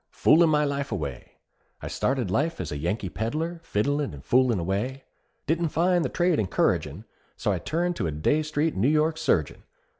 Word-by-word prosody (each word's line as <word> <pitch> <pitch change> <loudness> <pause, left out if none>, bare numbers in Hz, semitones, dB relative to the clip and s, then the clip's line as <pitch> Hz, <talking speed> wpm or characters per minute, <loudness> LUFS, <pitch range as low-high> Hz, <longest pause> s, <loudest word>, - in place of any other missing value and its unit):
_ - - -27
Foolin' 165 +1 +5
my 150 -1 +3
life 140 -1 -2
away: 75 - -5 0.5
I - - -7
started 125 -7 -1
life 160 - 0
as - - -4
a 75 - -3
Yankee 95 +6 -2
peddler, 155 - -3
Fiddlin' 145 - -1
and 70 +1 -13
foolin' 125 -3 +3
away. 105 +10 -2 0.4
Didn't 165 +2 0
find 175 +2 +2
the - - -1
trade 175 -2 +1
encouragin' 100 -4 0 0.3
So - - 0
I - - -1
turned 170 +6 -2
a 85 - 0
Dey 80 - +1
Street 155 +1 -1
New 110 +8 +2
York 155 +1 +2
surgeon. 95 - 0
140 Hz, 180 wpm, -26 LUFS, 100-160 Hz, 0.5 s, Foolin